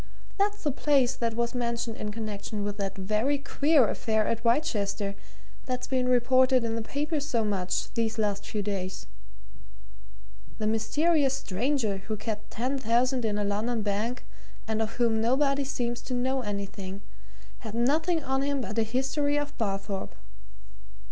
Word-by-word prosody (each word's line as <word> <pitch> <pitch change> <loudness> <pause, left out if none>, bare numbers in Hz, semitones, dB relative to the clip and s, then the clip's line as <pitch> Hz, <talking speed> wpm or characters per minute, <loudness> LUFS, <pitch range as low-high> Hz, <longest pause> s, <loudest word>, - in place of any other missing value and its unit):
"That's 410 +1 +1
the 295 - +2
place 270 -2 +3
that 230 -1 -1
was 235 +1 0
mentioned 235 -2 -1
in 210 - -3
connection 210 -1 -4
with 205 0 -3
that 195 -1 -3
very 215 +9 +1
queer 280 -1 +3
affair 220 0 +1
at 230 0 -1
Wrychester, 210 -6 +1 0.5
that's 250 -1 -2
been 255 -2 0
reported 255 +1 +4
in 230 -1 -1
the 230 - -1
papers 290 +5 -2
so 235 -6 +1
much 185 -3 -1
these 230 -1 0
last 205 -2 0
few 205 0 -3
days. 190 -2 -3 1.5
The 215 - -2
mysterious 270 +6 +2
stranger 240 -2 0
who 210 +3 -4
kept 215 0 -4
ten 255 +5 -1
thousand 245 +1 +2
in 210 -1 0
a 210 - 0
London 215 +3 0
bank, 215 +5 -1 0.4
and 220 0 0
of 220 0 -1
whom 230 -2 +2
nobody 275 +4 +2
seems 240 -3 -2
to 250 - 0
know 260 +2 +1
anything, 200 -2 -5 0.6
had 220 -2 -7
nothing 315 +7 +2
on 265 0 0
him 280 -1 0
but 230 -2 -2
a - - +4
history 270 +5 0
of 290 0 -2
Barthorpe. 195 -2 -2
230 Hz, 155 wpm, -28 LUFS, 210-265 Hz, 1.5 s, reported